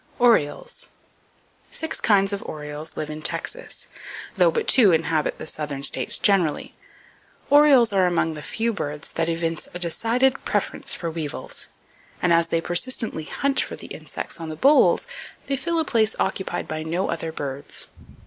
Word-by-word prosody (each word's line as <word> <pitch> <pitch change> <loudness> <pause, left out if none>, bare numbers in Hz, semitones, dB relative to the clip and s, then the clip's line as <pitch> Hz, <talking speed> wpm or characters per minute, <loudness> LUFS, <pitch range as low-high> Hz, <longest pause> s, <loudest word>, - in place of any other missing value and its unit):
Orioles. 245 - +2 0.8
—Six 320 0 -2
kinds 200 -2 +4
of 200 - -3
orioles 150 +1 -6
live 155 0 -3
in 155 0 -7
Texas, - - -3 0.5
though - - +5
but 460 -2 -1
two 225 -8 +6
inhabit 160 -2 +1
the - - -7
southern 150 -3 -5
states - - +2
generally. 185 -7 +2 0.8
Orioles 280 -6 +6
are 190 -2 +4
among 165 -2 +1
the 150 - -7
few 230 +8 -1
birds 150 -6 -5
that 165 0 -1
evince 165 -1 -2
a - - -1
decided 230 +10 +1
preference - - -1
for 170 -2 -4
weevils, 155 -3 -5 0.5
and 175 -1 +3
as 170 0 +4
they 165 0 0
persistently 175 -1 -1
hunt 275 - 0
for - - -4
the - - -8
insects - - -5
on 165 -1 -6
the 155 - -5
bolls, 285 - +5 0.4
they 275 - -1
fill 335 +5 -2
a 320 - +1
place 220 -5 +3
occupied 190 0 -2
by 155 0 -4
no 170 +4 -2
other 165 -1 -3
birds. 140 -3 -5
175 Hz, 160 wpm, -23 LUFS, 155-235 Hz, 0.8 s, two